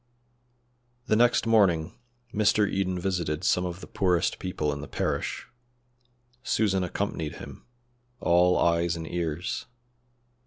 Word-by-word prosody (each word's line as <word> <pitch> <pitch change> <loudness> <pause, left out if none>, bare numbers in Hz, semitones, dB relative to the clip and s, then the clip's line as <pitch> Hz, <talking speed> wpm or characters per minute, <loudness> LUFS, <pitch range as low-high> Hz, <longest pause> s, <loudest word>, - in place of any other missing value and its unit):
The 110 - +2
next 120 +1 +3
morning 95 -7 +3 0.4
Mr. 105 -1 +3
Eden 95 -2 -1
visited 85 -5 -2
some 90 - +2
of 90 +1 -7
the - - -7
poorest 90 -3 +1
people 75 -5 -2
in 70 - -6
the 75 - -7
parish. - - -2 1.0
Susan 95 -6 +1
accompanied 90 -4 -3
him, - - -11 0.5
all 90 +1 +4
eyes 85 0 +2
and 80 -1 -5
ears. 85 +1 -3
90 Hz, 120 wpm, -27 LUFS, 85-95 Hz, 1.0 s, all